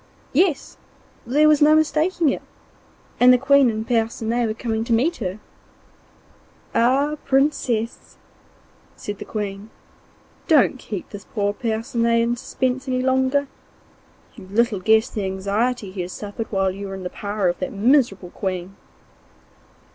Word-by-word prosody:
Yes! 325 0 +1 0.5
there 295 +5 +4
was 300 -1 +4
no 305 +1 +6
mistaking 315 +1 +2
it, - - -2 0.8
and 250 +1 +7
the 250 - +6
Queen 270 0 +4
and 220 0 -4
Percinet 230 0 0
were 215 - -3
coming 225 -1 -2
to 235 - 0
meet 295 +10 +1
her. 190 -3 -4 1.4
'Ah, 270 +6 +2
Princess!' 265 -5 0 0.8
said 205 -1 -7
the - - -7
Queen, 205 0 -5 0.8
'don't 285 -5 +4
keep 200 -6 -7
this 205 -1 -9
poor 205 -2 -1
Percinet 230 +1 0
in 235 +1 +1
suspense 260 +2 -2
any 255 -1 0
longer. 265 +2 +1 0.9
You 195 -5 -13
little 215 +1 +1
guess 220 +4 +3
the 210 - -4
anxiety 200 +3 -1
he 190 -1 -5
has 180 +1 -6
suffered 210 +2 -6
while 195 -2 +1
you 200 +1 -7
were 195 - -6
in 190 - -8
the 180 - -5
power 205 -2 -2
of 175 0 -1
that 185 - -3
miserable 205 -5 +2
Queen. 185 -1 -4
230 Hz, 145 wpm, -22 LUFS, 200-260 Hz, 1.4 s, and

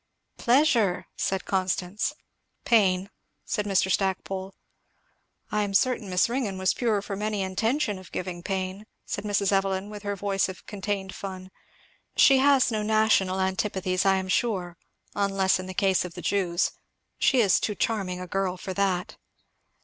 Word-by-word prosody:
"Pleasure!" 240 - +3
said 190 -1 -1
Constance. 190 +3 -1 0.5
"Pain!" 195 -4 +3 0.3
said 210 -1 -2
Mr. 190 -1 +2
Stackpole. 190 0 -1 1.0
"I 210 - +1
am 200 -1 -2
certain 240 -2 +2
Miss 180 -1 +3
Ringgan 230 -6 -2
was 190 0 +2
pure 220 -5 0
from 200 0 -5
any 210 -2 -1
intention 220 +3 0
of 185 - -14
giving 180 -1 -4
pain," 190 +2 -4 0.2
said 200 - -4
Mrs. 205 -1 +1
Evelyn 195 +1 0
with 210 -1 -8
her 205 -1 -3
voice 195 0 0
of 185 - -9
contained 195 -2 -4
fun. 185 -1 -7 0.7
"She 270 -1 +7
has 270 -2 +4
no 215 -1 -1
national 210 -3 +2
antipathies, 190 -1 0
I 195 -1 +4
am 190 0 -2
sure, 185 -3 0 0.4
unless 195 -2 +1
in 185 - -6
the 185 - -7
case 190 -1 +2
of 180 -1 -8
the - - -6
Jews, 185 -3 +1 0.5
she 265 - +4
is 200 -6 +4
too 210 - -2
charming 195 -6 -1
a 180 - -5
girl 185 0 -1
for 190 - -5
that." 185 -2 -1
195 Hz, 155 wpm, -26 LUFS, 185-210 Hz, 1.0 s, She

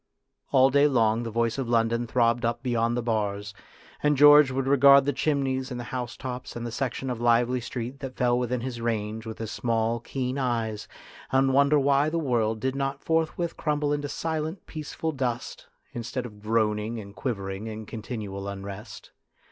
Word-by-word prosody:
All 135 0 +5
day 140 +2 +5
long 115 -4 +2
the 115 - -4
voice 115 +2 0
of 130 -3 -3
London 115 0 +1
throbbed 120 0 +2
up 120 +2 -1
beyond 120 -1 +1
the 120 - -1
bars, 105 -2 -2 0.5
and 150 -1 +2
George 145 0 +8
would 130 0 -1
regard 140 0 +6
the 145 - +1
chimneys 135 -2 0
and 125 -2 -5
the - - -4
housetops 125 +1 -5
and 120 0 -4
the 120 - -4
section 130 +1 -3
of 120 -2 -5
lively 120 +1 +3
street 125 +2 -5
that 135 -2 -6
fell 125 -1 +2
within 125 0 -1
his 120 -1 -5
range 110 -1 -2
with 110 - -6
his 110 -2 -5
small, 115 0 0
keen 130 +2 -3
eyes, 115 -4 -2 0.4
and 135 0 +3
wonder 140 +2 +5
why 140 +1 +3
the 170 - -2
world 115 -7 0
did 130 +4 -1
not 135 0 -2
forthwith 165 +1 0
crumble 150 -1 0
into 145 -1 -2
silent, 160 +3 -3
peaceful 155 +1 -4
dust, 125 -4 -4 0.3
instead 120 +2 -4
of 105 -3 -11
groaning 110 +1 0
and 100 -1 -10
quivering 100 -4 -4
in 110 0 -6
continual 105 -3 -6
unrest. 100 +2 -8
120 Hz, 180 wpm, -26 LUFS, 115-135 Hz, 0.5 s, George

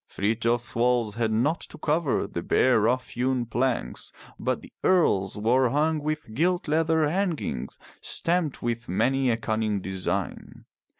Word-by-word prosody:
Frithjof's 115 +3 -1
walls 120 -2 +1
had 115 0 -1
naught 135 +10 +1
to - - -11
cover 155 -2 0
the 85 - -5
bare 125 +6 +3
rough 125 +3 +1
hewn 125 0 0
planks, 120 - -2 0.3
but - - -1
the - - -15
Earl's 105 - +2
were 120 +4 +3
hung 155 +4 +1
with 150 -6 -4
gilt 175 +8 +1
leather 160 0 +2
hangings 165 - -2 0.2
stamped 170 -4 -1
with 120 -3 -3
many 130 +8 +2
a 115 - +2
cunning 110 -2 -1
design. 95 0 -4
125 Hz, 140 wpm, -26 LUFS, 110-150 Hz, 0.3 s, bare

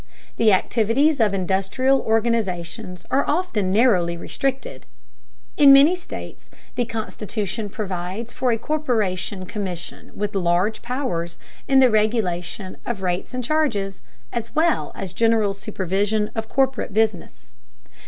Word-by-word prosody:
The 225 -2 +4
activities 230 +9 +2
of 215 -3 +3
industrial 195 +8 +1
organizations 210 -5 -1
are 275 - +3
often 290 - 0
narrowly 190 -6 +3
restricted. 270 +9 -4 0.7
In 285 -2 +8
many 280 +6 +7
states 355 - -9 0.2
the 245 - 0
constitution 215 -1 -4
provides 195 +3 -5
for 255 -2 0
a 225 - +1
corporation 215 -10 -1
commission 185 -4 -6
with 205 0 -3
large 185 +3 +1
powers 185 -10 -3 0.3
in 270 0 +5
the 255 -2 +6
regulation 200 -4 -1
of 210 -5 -4
rates 180 +6 -2
and 255 - -2
charges, 230 -9 0 0.3
as 230 -1 -5
well 330 +2 +2
as 190 -3 -5
general 225 -3 +2
supervision 205 +1 -1
of 220 -1 -4
corporate 265 -7 0
business. 190 - -1
215 Hz, 125 wpm, -22 LUFS, 190-245 Hz, 0.7 s, In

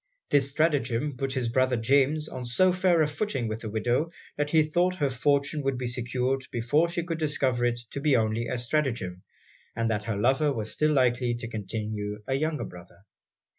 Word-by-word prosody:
This 140 -1 +4
stratagem 140 -3 0
put 135 +1 -2
his 130 -3 -1
brother 130 +1 +2
James 140 +6 +2
on 130 - -6
so 155 +10 +3
fair 180 -3 +3
a - - +1
footing 150 - -2
with 110 +1 -4
the 110 - -5
widow, 120 +8 0 0.3
that 145 0 -1
he 160 0 +5
thought 175 +4 +1
her 145 -6 0
fortune 140 +3 +1
would 135 -2 -1
be 125 - -3
secured 125 +2 -1
before 125 +8 +2
she 170 0 -2
could 165 -1 -4
discover 135 -5 +1
it 120 0 0
to 140 - -5
be 145 -2 +3
only 110 +1 0
a 125 - -2
stratagem, 120 -8 -1 0.5
and 115 0 0
that 105 -1 -2
her 110 -3 -2
lover 135 +7 +2
was 110 -5 -3
still 155 0 +2
likely 125 -2 +2
to 120 0 -5
continue 105 -1 -4
a 135 - -2
younger 155 +3 -1
brother. 90 +3 -13
130 Hz, 195 wpm, -27 LUFS, 115-150 Hz, 0.5 s, he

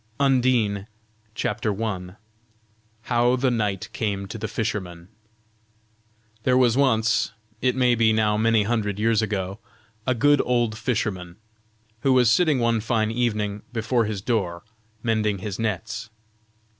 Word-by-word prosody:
UNDINE. 125 -7 +2 0.5
CHAPTER 105 0 -2
I. 90 -4 -4 0.9
HOW 120 +1 +2
THE 130 0 +1
KNIGHT 105 -5 -1
CAME 100 -3 -2
TO 115 - -7
THE 110 - -3
FISHERMAN. 95 -5 -4 1.3
There 125 +3 +2
was 125 -3 +4
once, 115 -7 +2 0.3
it 125 -1 +2
may 125 -2 +3
be 115 -1 +3
now 110 -1 +2
many 110 0 +3
hundred 105 -2 -1
years 110 0 +2
ago, 100 -2 -3 0.5
a 130 - +2
good 145 +4 +4
old 120 -3 +1
fisherman, 105 -6 -2 0.6
who 135 +3 +2
was 125 -3 +5
sitting 155 +1 +3
one 115 -2 +2
fine 110 -1 0
evening 105 -4 -1
before 115 0 0
his 105 -2 -4
door, 95 -8 -1 0.4
mending 110 -3 +1
his 95 +1 -5
nets. 110 +1 -3
110 Hz, 130 wpm, -24 LUFS, 105-120 Hz, 1.3 s, was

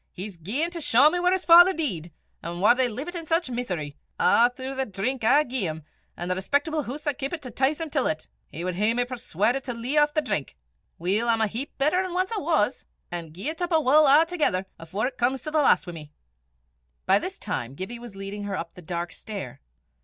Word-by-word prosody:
"He's 195 +1 -7
gaein' 235 - -2
to 340 -1 -5
shaw 285 +2 +5
me 355 - -1
whaur 360 0 +2
his 375 0 0
father 350 +3 +8
dee'd, 185 - -2 0.3
an' 170 +1 -5
whaur 210 +5 +6
they 255 0 +2
leevit 280 +11 -6
in 330 -2 -6
sic 330 -2 +1
meesery 175 -12 -4 0.2
a' 240 +1 +5
throu' 260 +2 -6
the 265 0 -1
drink 220 +6 -3
I 285 +7 +5
gae 250 - -2
'im, 155 0 -6 0.3
an' 175 - -4
the 185 - +1
respectable 285 - 0
hoose 285 +3 -7
I 290 - +1
keepit 285 +3 -4
to 250 - -7
'tice 275 +6 +1
him 325 -2 -5
till 275 -4 +1
't! 155 0 -8 0.2
He 170 +4 -6
wad 185 - -1
hae 210 +5 +1
me 245 0 +1
persuaudit 245 0 -1
to 250 - -3
lea' 245 +6 -2
aff 295 0 +2
the 310 - +2
drink! 150 - -3 0.4
Weel, 200 +7 +1
I'm 225 -1 +3
a - - +4
heap 240 +8 -5
better 305 +7 +2
nor 365 -1 -3
ance 375 - -4
I - - -1
was, 285 -7 0 0.2
an' 170 -2 -4
gie 195 - -4
't 330 - -5
up 350 - -2
I 325 - +5
wull 300 0 +5
a'thegither 300 - +3
afore 175 +7 -3
it 255 0 -4
comes 255 +2 +1
to 305 - -5
the 310 - +2
last 270 - +4
wi' 175 - -7
me." 150 -2 -10 0.9
By - - +5
this - - -6
time 120 +3 -4
Gibbie 220 +9 -6
was 235 -4 -11
leading 195 +1 -6
her 200 -2 -3
up 165 0 -6
the 180 - -12
dark 175 0 -4
stair. 195 - -8
245 Hz, 235 wpm, -25 LUFS, 190-300 Hz, 0.9 s, father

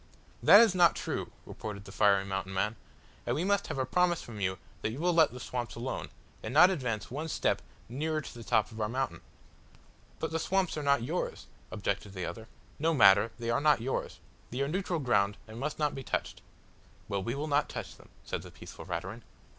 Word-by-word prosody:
"That 205 - +9
is 225 -5 +5
not 175 -2 +5
true," - - -3
retorted 100 -2 -7
the 95 - -10
fiery 100 -1 +3
Mountain 95 0 -4
man, 105 +4 0 0.5
"and - - +1
we 165 - 0
must 200 +1 +1
have - - -4
a 130 - 0
promise 175 +5 +2
from 110 -3 -9
you 95 0 0 0.2
that - - 0
you 115 - -6
will 175 +2 +2
let 160 -3 +5
the 125 - -8
swamps 120 -1 -4
alone, 120 +3 -4 0.3
and 110 - -5
not 175 +7 +7
advance 125 - -3
one 150 +5 -3
step - - 0 0.3
nearer 155 +6 -1
to 150 - -8
the 120 - -9
top 110 +1 +2
of 110 0 -6
our 105 - 0
mountain." 130 +2 -2 1.0
"But 160 - -3
the 165 - 0
swamps 190 +2 0
are 155 - -3
not 140 -4 +3
yours," 160 +9 -3 0.2
objected 100 -1 -3
the 90 -3 -4
other. 110 0 -7 0.3
"No 160 +2 +2
matter 100 -2 +6
they 115 0 -2
are 115 - +1
not 150 -2 +4
yours. 130 +4 -3 0.3
They 125 +3 -3
are 140 - +1
neutral 180 +2 -1
ground, 100 - +2
and 110 +1 -9
must 150 +3 -3
not 150 -1 +1
be 135 - -5
touched." - - -3 0.7
"Well, 100 -1 -1
we 120 +6 -2
will 145 +2 -2
not 145 0 +2
touch - - -6
them," - - -18
said - - -4
the - - -11
peaceful - - -11
Raturan. - - -5
130 Hz, 215 wpm, -30 LUFS, 110-155 Hz, 1.0 s, That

